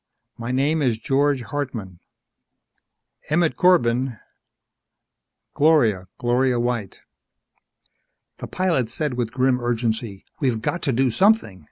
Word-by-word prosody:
My 115 +1 -6
name 145 +5 +1
is 120 -5 +1
George 135 +2 +1
Hartman." 115 -8 -5 1.3
"Emmett 160 +1 +2
Corbin." 130 -9 +2 1.4
"Gloria... 120 - +3
Gloria 125 +1 +1
White." 120 -4 -3 1.4
The - - -6
pilot 165 -11 0
said 150 +3 -3
with 120 -2 -2
grim 130 0 +1
urgency: 115 -4 -2
"We've 125 -6 0
got 170 +10 -3
to 140 - 0
do 130 +1 +1
something. 190 - +2
125 Hz, 110 wpm, -22 LUFS, 115-145 Hz, 1.4 s, Gloria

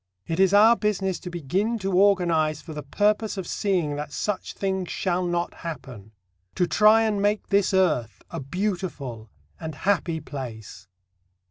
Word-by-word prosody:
It 165 +2 -3
is 190 -1 +5
our 215 +3 +7
business 195 -4 -1
to 180 - -7
begin 180 - -1
to 195 -2 -3
organize 170 -6 +3
for 155 - -9
the 150 - -5
purpose 210 +8 0
of 190 - -3
seeing 175 -7 -1
that 150 0 -5
such 205 +3 -3
things 190 -2 -2
shall 180 -1 -1
not 175 0 -1
happen; 130 - -8 0.4
to 180 - +2
try 215 +4 +5
and 210 -2 0
make 205 +1 0
this 200 -1 +3
earth 150 - +1
a - - -4
beautiful 140 - -4 0.3
and 160 -2 -6
happy 170 0 0
place. 110 -9 -8
180 Hz, 155 wpm, -25 LUFS, 150-200 Hz, 0.4 s, our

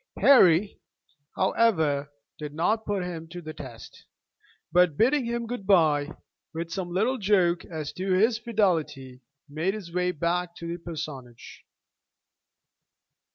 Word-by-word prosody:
Harry, 200 -8 +5 0.5
however, 160 -9 +1 0.3
did 150 -1 -7
not 215 +7 0
put 200 -3 -1
him 165 -2 -6
to 175 +2 -8
the 155 -2 -8
test; 130 -6 -11 0.7
but 180 -4 +3
bidding 260 +3 +3
him 235 0 -2
good 225 -4 -6
bye 155 -7 +3 0.5
with 165 0 -4
some 180 0 -4
little 220 +9 0
joke 185 -4 +2
as 155 -3 -6
to 185 +4 -3
his 220 +4 +3
fidelity, 165 - -1 0.3
made 160 +7 -2
his 180 -6 -9
way 180 0 +1
back 170 +1 -2
to 170 - -9
the 170 +1 -5
parsonage. 145 -8 -8
175 Hz, 130 wpm, -26 LUFS, 155-205 Hz, 0.7 s, Harry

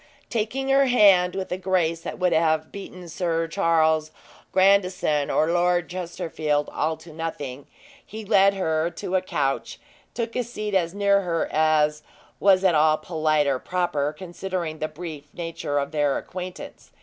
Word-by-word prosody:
Taking 240 +5 -2
her 275 0 +4
hand, 195 -7 +5
with 190 -1 -4
a 180 - -2
grace 175 -3 0
that - - -6
would 180 -1 +1
have 160 -1 +1
beaten 185 -3 -9
Sir 165 0 -1
Charles 160 -3 +2 0.4
Grandison 185 -6 +2
or 155 +2 +2
Lord 175 0 +1
Chesterfield 160 -4 -2
all 160 +1 -1
to 160 0 -14
nothing, 145 -4 -6 0.4
he 220 0 -9
led 200 -1 +4
her 160 -3 0
to 180 +1 -4
a 185 - +3
couch, 140 -7 -2 0.3
and - - -42
took 230 -1 -3
a 250 - 0
seat 215 -3 -5
as 175 -1 +1
near 200 -1 +3
her 170 -3 -1
as 150 -1 +2 0.4
was 195 -1 +4
at 185 -2 +4
all 155 0 +4
polite 155 -2 0
or 135 -2 0
proper, 150 -5 -1
considering 175 -1 -5
the 155 - -1
brief 155 -2 -8
nature 165 -4 -3
of 140 0 -1
their 145 -3 +1
acquaintance. 180 0 -8
170 Hz, 160 wpm, -24 LUFS, 155-190 Hz, 0.4 s, hand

